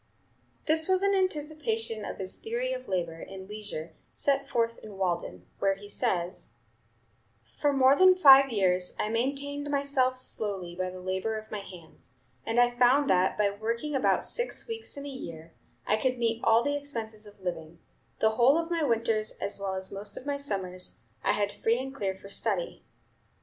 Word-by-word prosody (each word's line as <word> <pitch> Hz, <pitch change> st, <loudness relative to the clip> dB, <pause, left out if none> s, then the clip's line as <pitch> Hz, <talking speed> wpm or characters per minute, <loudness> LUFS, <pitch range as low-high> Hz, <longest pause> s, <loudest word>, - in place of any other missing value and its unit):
This 320 Hz, 0 st, +3 dB
was 375 Hz, 0 st, +2 dB
an 400 Hz, 0 st, +3 dB
anticipation 295 Hz, -, -1 dB
of -, -, -6 dB
his 190 Hz, -1 st, -2 dB
theory 485 Hz, +2 st, -3 dB
of -, -, -6 dB
labor 170 Hz, -3 st, -2 dB
and 190 Hz, -1 st, -9 dB
leisure 205 Hz, -6 st, -7 dB, 0.2 s
set 275 Hz, -1 st, 0 dB
forth 230 Hz, -2 st, 0 dB
in 210 Hz, -3 st, -11 dB
"Walden," 170 Hz, -, -2 dB
where 195 Hz, 0 st, +2 dB
he 205 Hz, +1 st, -12 dB
says: 175 Hz, -3 st, -2 dB, 1.0 s
"For 290 Hz, -, +2 dB
more 270 Hz, 0 st, +5 dB
than 370 Hz, +3 st, +7 dB
five 275 Hz, -6 st, +8 dB
years 185 Hz, -4 st, +1 dB
I 210 Hz, -, 0 dB
maintained 280 Hz, +5 st, -2 dB
myself 275 Hz, -3 st, +1 dB
solely 200 Hz, -8 st, -2 dB
by 185 Hz, 0 st, -2 dB
the 185 Hz, 0 st, -9 dB
labor 190 Hz, +4 st, -2 dB
of 215 Hz, 0 st, -9 dB
my 210 Hz, -, -3 dB
hands, 175 Hz, -9 st, -13 dB, 0.3 s
and 230 Hz, +1 st, +2 dB
I 245 Hz, 0 st, +5 dB
found 250 Hz, +4 st, +4 dB
that, 185 Hz, 0 st, +3 dB
by 205 Hz, -1 st, +2 dB
working 230 Hz, +8 st, -3 dB
about 270 Hz, -, +2 dB
six 485 Hz, 0 st, -1 dB
weeks 450 Hz, -8 st, -6 dB
in 280 Hz, -, -6 dB
a -, -, -5 dB
year, 165 Hz, -, -8 dB, 0.3 s
I 215 Hz, -, +2 dB
could 255 Hz, +3 st, 0 dB
meet 230 Hz, -1 st, 0 dB
all 230 Hz, +1 st, +5 dB
the 285 Hz, +2 st, 0 dB
expenses 225 Hz, -7 st, -4 dB
of 205 Hz, 0 st, -16 dB
living; 170 Hz, -3 st, -5 dB, 0.4 s
the 220 Hz, -, +4 dB
whole 245 Hz, +6 st, +5 dB
of 335 Hz, +1 st, -2 dB
my 335 Hz, -1 st, +1 dB
winters, 225 Hz, -4 st, +1 dB
as 200 Hz, -, -4 dB
well 195 Hz, -1 st, -2 dB
as 190 Hz, 0 st, -5 dB
most 200 Hz, +1 st, -4 dB
of -, -, -8 dB
my 285 Hz, -1 st, -1 dB
summers, 185 Hz, -9 st, -3 dB, 0.2 s
I -, -, +3 dB
had 205 Hz, -1 st, 0 dB
free 225 Hz, +3 st, +1 dB
and 265 Hz, +1 st, -5 dB
clear 195 Hz, -7 st, -3 dB
for 195 Hz, -, -12 dB
study. -, -, -2 dB
225 Hz, 185 wpm, -29 LUFS, 195-280 Hz, 1.0 s, five